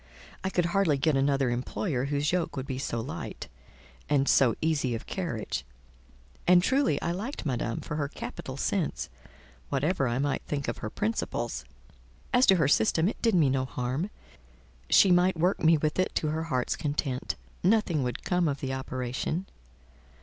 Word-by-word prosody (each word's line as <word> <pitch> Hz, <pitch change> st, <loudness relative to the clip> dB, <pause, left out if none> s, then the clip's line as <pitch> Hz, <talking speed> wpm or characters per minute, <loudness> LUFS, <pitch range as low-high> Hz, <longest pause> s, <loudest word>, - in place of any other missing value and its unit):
I 190 Hz, -, 0 dB
could 175 Hz, -2 st, +1 dB
hardly 190 Hz, -8 st, +3 dB
get 150 Hz, +2 st, +2 dB
another 135 Hz, -2 st, +2 dB
employer 125 Hz, +3 st, -2 dB
whose 145 Hz, +1 st, 0 dB
yoke 180 Hz, -4 st, -1 dB
would 130 Hz, -, -3 dB
be 130 Hz, -1 st, -4 dB
so 120 Hz, -3 st, -2 dB
light 125 Hz, +5 st, -6 dB, 0.6 s
and 140 Hz, -2 st, +3 dB
so, 125 Hz, -5 st, +4 dB
easy 145 Hz, -6 st, +1 dB
of 115 Hz, -, -6 dB
carriage; 165 Hz, -, -3 dB, 0.8 s
and 180 Hz, 0 st, +6 dB
truly 260 Hz, -, +2 dB
I 170 Hz, -, 0 dB
liked 210 Hz, -, -4 dB
Madame 120 Hz, -4 st, -1 dB
for 150 Hz, -, -4 dB
her 145 Hz, -2 st, 0 dB
capital 135 Hz, -2 st, -7 dB
sense, 180 Hz, +3 st, -1 dB, 0.6 s
whatever 140 Hz, +1 st, +1 dB
I 120 Hz, +1 st, 0 dB
might 140 Hz, +1 st, 0 dB
think 140 Hz, -2 st, -2 dB
of 120 Hz, -, -3 dB
her 110 Hz, -, -4 dB
principles: 105 Hz, -, -2 dB, 0.7 s
as 250 Hz, +2 st, +5 dB
to 195 Hz, -, +7 dB
her 155 Hz, -6 st, +3 dB
system, 145 Hz, +6 st, +3 dB
it 215 Hz, -, -3 dB
did 225 Hz, -4 st, +3 dB
me 160 Hz, -5 st, +5 dB
no 130 Hz, 0 st, +1 dB
harm; 130 Hz, +7 st, -2 dB, 0.8 s
she 195 Hz, -, +6 dB
might 180 Hz, 0 st, +4 dB
work 180 Hz, +4 st, +1 dB
me 160 Hz, 0 st, +6 dB
with 150 Hz, +3 st, -1 dB
it 185 Hz, -, +1 dB
to 155 Hz, -, +1 dB
her 160 Hz, +1 st, -2 dB
heart's 130 Hz, -6 st, 0 dB
content: 145 Hz, -4 st, -2 dB, 0.3 s
nothing 190 Hz, -6 st, +2 dB
would 125 Hz, -1 st, -3 dB
come 180 Hz, -2 st, +1 dB
of 140 Hz, -2 st, -1 dB
the 130 Hz, -1 st, -3 dB
operation. 130 Hz, +6 st, -3 dB
145 Hz, 170 wpm, -28 LUFS, 130-175 Hz, 0.8 s, to